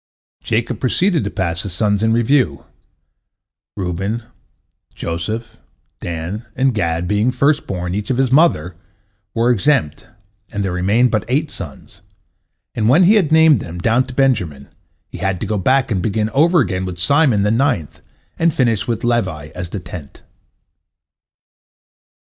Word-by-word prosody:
Jacob 115 +1 -1
proceeded 170 +6 +1
to 100 - -2
pass 85 -4 -2
his 95 -3 -5
sons 105 +1 +1
in 110 0 +2
review: 120 +4 +1 1.1
Reuben, 95 +5 -3 0.7
Joseph, 105 +8 -4 0.4
Dan, 85 +6 -5
and 135 -1 +2
Gad 85 -4 -1
being 105 +5 +1
the 125 - -4
first 145 +3 +2
born, 90 -2 -3
each 105 +1 -3
of 130 - 0
his 130 -2 +1
mother, 130 - +3 0.6
were 115 +2 +3
exempt, 120 - 0 0.4
and 100 -1 -2
there 95 - -2
remained 100 +8 +2
but 110 -4 0
eight 145 +5 0
sons, 75 -8 -8 0.7
and 110 -1 +1
when 160 +9 +5
he 190 +5 +6
had 185 -9 +2
named 160 -4 +6
them, 85 -2 -7
down 115 +8 +2
to 130 - -10
Benjamin, 100 - 0 0.4
he - - -10
had 95 0 -1
to - - -3
go 105 -2 -1
back 130 +5 +2
and 95 -4 0
begin 110 +3 -1
over 165 +6 +4
again 95 -5 -1
with 90 -1 -5
Simon, 125 - +3
the 105 - +2
ninth, 115 - 0 0.4
and 165 0 +3
finish 115 -5 +1
with 115 -2 -2
Levi 95 -11 -1
as 90 -1 -6
the 100 - -5
tenth. 85 -5 -10
110 Hz, 155 wpm, -18 LUFS, 90-130 Hz, 1.1 s, he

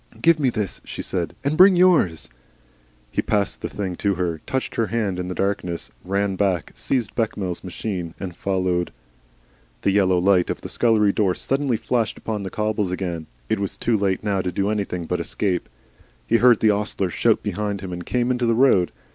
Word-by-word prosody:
"Give 165 -1 +4
me 135 -3 +3
this," 105 -6 -3
she - - -6
said, - - -2
"and 140 +2 0
bring 185 +2 +8
yours." 170 - +3 0.8
He - - 0
passed 100 -2 0
the - - -3
thing 95 -3 -4
to 100 -2 +1
her, 85 -3 -2
touched 130 0 -2
her 115 - 0
hand 105 -6 -1
in 90 - -3
the 90 - -4
darkness, 90 -9 -2
ran 100 +1 0
back, 95 -5 0
seized 120 -6 -1
Bechamel's 100 -6 -2
machine, 90 -2 -4
and 90 -3 -6
followed. 90 -2 0 0.9
The 100 - +3
yellow 95 -2 +3
light 90 0 +3
of - - -3
the - - -7
scullery 110 -4 +3
door 95 -4 +1
suddenly 135 -3 0
flashed 115 0 -1
upon 110 -2 -3
the 95 - -4
cobbles 105 -1 -1
again. 90 -4 -3 0.2
It 110 - 0
was 100 0 -3
too 115 +3 +1
late 100 -2 0
now 100 -2 0
to 90 - -2
do 100 +2 0
anything 95 -5 -2
but - - -1
escape. 90 -4 -2 0.6
He 115 - +3
heard 120 -1 +5
the 110 - +5
ostler 100 -3 -1
shout - - +2
behind 105 -2 -2
him, 95 -2 -6
and 90 0 -5
came 125 +6 0
into 125 -1 0
the 115 - +3
road. 115 -8 +4
100 Hz, 195 wpm, -23 LUFS, 90-115 Hz, 0.9 s, bring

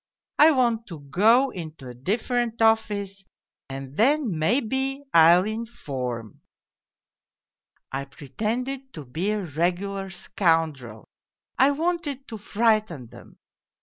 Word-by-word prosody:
I 305 - +9
want 240 -5 +1
to 165 -5 -9
go 225 - +3
into 155 -6 -8
a 125 - -8
different 230 - -1
office 210 -3 +1 0.5
and 135 0 -7
then, 255 - +2
maybe, 265 - 0
I'll 170 +3 +7
inform.' 140 - -5 1.5
I 135 +1 -3
pretended 235 - -4
to 155 -3 -8
be 160 +11 -2
a 210 -1 -1
regular 180 +5 -2
scoun 165 -4 +1
drel, 115 -5 -12 0.5
I 265 - +6
wanted 295 -3 -2
to 220 -3 -7
frighten 210 - 0
them. - - -15
200 Hz, 115 wpm, -25 LUFS, 155-240 Hz, 1.5 s, I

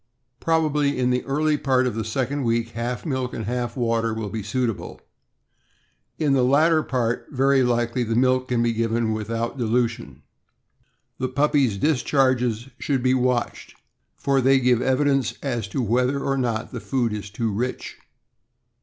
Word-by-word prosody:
Probably 150 -3 +1
in 125 0 +1
the 125 0 0
early 150 +2 +1
part 130 -2 +2
of 125 - -1
the 110 +1 -3
second 130 +5 -2
week 115 -1 0
half 120 +4 -4
milk 130 -4 -2
and 110 - -4
half 120 +2 -3
water 115 -2 0
will 110 -2 -4
be 110 - -3
suitable; 115 +1 -3 1.2
in 150 -3 +1
the 135 - +3
latter 155 +5 +4
part, 120 -5 -2
very 135 0 +3
likely, 120 0 0
the 115 -1 -1
milk 130 +1 +2
can 120 -2 +1
be 120 -1 +1
given 115 0 0
without 115 +4 -3
dilution. 115 - -1 1.0
The 130 - 0
puppies' 140 -5 +2
discharges 130 -3 +1
should 135 -4 -1
be 130 0 +3
watched, 125 -1 -1 0.4
for 135 -1 +1
they 135 +1 +4
give 125 -2 +2
evidence 135 -1 +1
as 120 -7 -2
to 125 +5 -2
whether 125 +5 +1
or 135 0 -1
not 120 -4 -2
the 125 - -5
food 120 -5 -1
is 105 -1 -5
too 110 0 -2
rich. 125 +5 -4
125 Hz, 160 wpm, -23 LUFS, 115-135 Hz, 1.2 s, latter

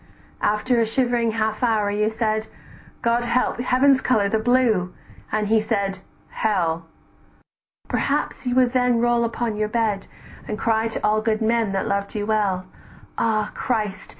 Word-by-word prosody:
"After 235 +4 +1
a 230 - +3
shivering 240 -1 +1
half 220 -1 -1
hour 220 -4 +2
you 210 +1 +1
said: 220 -1 -1 0.6
'God 235 0 +2
help! 240 0 0
heaven's 260 +2 +3
color, 215 -5 +2
the 220 - +1
blue;' 220 -6 +2 0.4
and 215 -1 0
he 220 +1 +3
said, 200 -3 -1 0.3
'hell.' 165 -6 -1 1.0
Perhaps - - -1
you 245 - 0
would 255 -1 +3
then 250 -2 +2
roll 240 0 +2
upon 230 -1 -2
your 215 0 -1
bed, 215 -3 -1 0.4
"And 210 - -3
cry 225 0 +1
to 225 - -4
all 215 +1 +2
good 220 -1 0
men 225 -2 +1
that 195 - -1
loved 200 +1 -2
you 205 -1 -2
well, 205 -4 0 0.5
'Ah 215 -2 +1
Christ! 210 -6 -2
220 Hz, 155 wpm, -22 LUFS, 210-235 Hz, 1.0 s, a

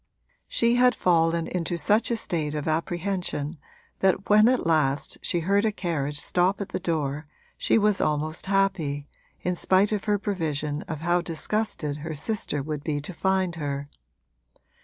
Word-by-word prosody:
She 235 +1 +2
had 250 -1 +5
fallen 165 -1 +2
into 175 -1 -2
such 205 +8 +3
a 235 - 0
state 155 -7 -2
of 150 0 -3
apprehension 170 -2 -2 0.4
that 190 +1 +1
when 215 +1 +7
at 255 +1 +2
last 150 -4 +1
she 175 - 0
heard 200 +4 +2
a 220 - +2
carriage 150 -7 -2
stop 180 +5 +1
at 200 - -4
the - - -3
door 150 -4 -2 0.3
she - - +2
was 210 -2 +2
almost 155 +4 -1
happy, 165 -8 0 0.3
in 180 0 -1
spite 190 +4 +3
of 210 -2 -2
her 210 -1 +2
prevision 155 -7 -2
of 155 -2 -5
how 175 +2 +2
disgusted 165 -3 -1
her 155 +1 -5
sister 150 -3 -2
would 150 0 -4
be 145 -2 -1
to 145 +6 -7
find 190 -1 0
her. 140 -2 -3
170 Hz, 160 wpm, -26 LUFS, 150-195 Hz, 0.4 s, when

